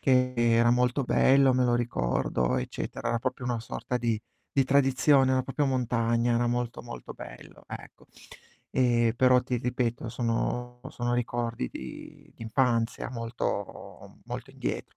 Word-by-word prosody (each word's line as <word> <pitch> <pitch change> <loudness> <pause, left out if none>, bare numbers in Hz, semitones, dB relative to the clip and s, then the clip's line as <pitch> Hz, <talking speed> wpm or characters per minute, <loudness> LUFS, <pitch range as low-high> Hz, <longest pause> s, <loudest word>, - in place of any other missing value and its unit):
che 125 -1 +3
era 120 0 +4
molto 125 +2 +2
bello, 135 +1 +4
me 130 - +3
lo 120 -1 +3
ricordo, 65 - 0
eccetera. 65 - -4
Era 115 0 +1
proprio 130 0 -3
una 120 -2 -1
sorta 120 +2 -4
di 115 -2 0 0.3
di 135 - +3
tradizione, 135 0 +4
era 130 0 +2
proprio 145 +2 -1
montagna, 120 -2 +1
era 120 +1 +2
molto, 120 0 -2
molto 120 - -8
bello, - - -12
ecco. - - -10 0.7
Ehm, 120 -3 +3
però 125 0 +5
ti 125 0 -2
ripeto, 120 -1 -2
sono 120 +1 -2
sono 120 0 -2
ricordi 120 - -2
di - - -10
d'infanzia 115 0 0
molto 115 -4 -5
molto - - -6
indietro. - - -5
120 Hz, 140 wpm, -28 LUFS, 115-125 Hz, 0.7 s, però